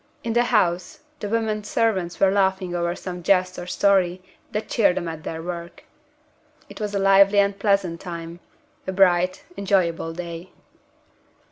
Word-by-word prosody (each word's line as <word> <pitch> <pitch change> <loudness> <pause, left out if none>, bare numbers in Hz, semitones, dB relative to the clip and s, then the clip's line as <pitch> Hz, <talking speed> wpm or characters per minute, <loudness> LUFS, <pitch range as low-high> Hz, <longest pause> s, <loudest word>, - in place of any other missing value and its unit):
In 230 - -2
the 240 +1 +3
house, 180 -7 0 0.2
the 205 - -4
women 220 -1 -1
servants 200 -5 -1
were 195 -1 +4
laughing 190 -2 +1
over 170 0 -1
some 180 -1 -7
jest 185 0 +2
or 175 - -7
story 185 -1 +2 0.3
that 210 - -3
cheered 200 -5 +2
them 175 -2 -2
at 160 -1 -6
their 160 0 -5
work. 170 0 -7 0.9
It - - -10
was 205 -1 -3
a - - +2
lively 195 +1 +5
and 200 0 +2
pleasant 195 -5 +1
time 170 -1 -7 0.5
a 190 - -2
bright, 185 -1 +3
enjoyable 180 -4 0
day. 170 +1 -8
185 Hz, 155 wpm, -23 LUFS, 175-200 Hz, 0.9 s, lively